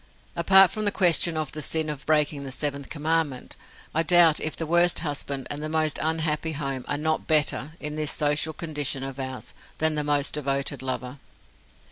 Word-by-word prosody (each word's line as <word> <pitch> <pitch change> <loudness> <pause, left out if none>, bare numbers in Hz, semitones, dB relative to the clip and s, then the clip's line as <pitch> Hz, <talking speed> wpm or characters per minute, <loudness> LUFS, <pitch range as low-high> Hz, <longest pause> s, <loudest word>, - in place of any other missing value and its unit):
Apart 190 +2 +6
from 215 - -3
the 205 - +1
question 170 -3 +4
of 155 -3 -3
the 155 - -5
sin 160 +2 +1
of 150 -2 -6
breaking 150 -2 +1
the 135 - -6
seventh 140 0 -2
commandment, 155 -3 -2 0.4
I 160 - +2
doubt 165 -2 +6
if 155 - -3
the 165 - -4
worst 175 +2 +3
husband 140 -2 -3
and 145 +1 -4
the 155 - -4
most 155 -1 0
unhappy 160 0 -1
home 135 -3 -5
are 145 - -2
not 155 +1 -2
better, 150 -1 +1
in 150 0 -6
this 155 -1 0
social 150 +1 +1
condition 150 -4 -2
of 135 0 -7
ours, 130 -1 -6 0.2
than 160 0 +1
the 150 -1 -2
most 145 -1 0
devoted 140 -1 -2
lover. 130 +1 -5
150 Hz, 185 wpm, -25 LUFS, 140-160 Hz, 0.4 s, Apart